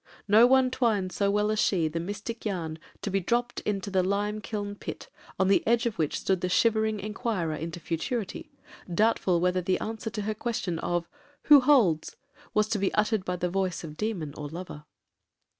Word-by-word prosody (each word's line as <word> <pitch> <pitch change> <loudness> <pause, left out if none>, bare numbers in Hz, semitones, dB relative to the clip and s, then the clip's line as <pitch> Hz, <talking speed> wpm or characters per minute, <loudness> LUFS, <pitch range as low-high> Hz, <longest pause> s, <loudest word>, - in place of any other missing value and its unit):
No 220 +4 +7
one 260 0 +4
twined 210 -8 +1
so 200 +1 +1
well 210 +1 +2
as 215 - 0
she 175 -7 +2
the 160 +2 -3
mystic 205 +6 -5
yarn 165 -6 -3 0.2
to 205 - -2
be 195 - +2
dropt 240 +6 -1
into 200 -1 -2
the 190 -1 +3
lime 205 +3 -1
kiln 205 -1 -4
pit, 205 - -8 0.3
on 190 - +3
the 195 - +4
edge 235 +1 +3
of 230 -6 -2
which 155 -2 0
stood 190 -2 0
the 180 - -1
shivering 220 +2 +2
inquirer 210 -5 -2
into 165 +2 -5
futurity, 185 +7 -3 0.4
doubtful 190 -2 +2
whether 180 +1 +1
the 185 +1 0
answer 220 0 -4
to 210 -1 -4
her 215 +1 -1
question 210 -6 -3
of 175 -1 -1 0.4
'who 295 -2 +8
holds?' 245 - +3 0.4
was 215 0 +2
to 220 -2 0
be 195 - +1
uttered 215 -1 +1
by 180 -1 -2
the 180 0 -1
voice 185 -2 -1
of 155 -2 -8
demon 180 -8 -3
or 150 - -5
lover. 165 -2 -8
200 Hz, 190 wpm, -28 LUFS, 180-220 Hz, 0.4 s, who